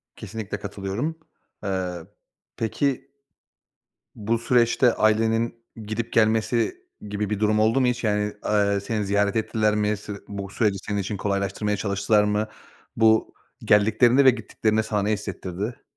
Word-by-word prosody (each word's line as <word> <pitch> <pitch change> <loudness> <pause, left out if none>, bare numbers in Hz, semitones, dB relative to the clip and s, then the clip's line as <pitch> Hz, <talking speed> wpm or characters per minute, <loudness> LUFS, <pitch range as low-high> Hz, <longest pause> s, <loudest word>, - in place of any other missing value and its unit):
Kesinlikle 110 -3 -6
katılıyorum. 105 +12 -4 0.4
Eee, 90 -3 -3 0.5
peki 135 +4 -1 1.0
bu 110 +2 -1
süreçte 120 +1 +3
ailenin 115 +2 +2 0.3
gidip 115 +2 -4
gelmesi 115 - +2 0.3
gibi 105 0 -2
bir 105 - -2
durum 105 0 +2
oldu 115 +5 +3
mu 125 - +3
hiç? 125 0 -1
Yani, 105 -1 0
eee, 100 -1 +2
seni 105 0 -2
ziyaret 100 +1 +1
ettiler 110 -1 +1
mi? 105 0 +1
Se 105 0 -7
bu 100 -1 -6
süreci 105 -1 0
senin 105 +1 -3
için 100 +1 -3
kolaylaştırmaya 100 +1 -1
çalıştılar 100 +1 +2
mı? 105 +1 0 0.5
Bu, 110 0 +3 0.3
geldiklerinde 110 +6 +4
ve 130 - +10
gittiklerinde 110 -2 -1
sana 105 -1 -1
ne 105 +2 0
hissettirdi? 100 +2 -5
105 Hz, 135 wpm, -24 LUFS, 100-115 Hz, 1.0 s, ve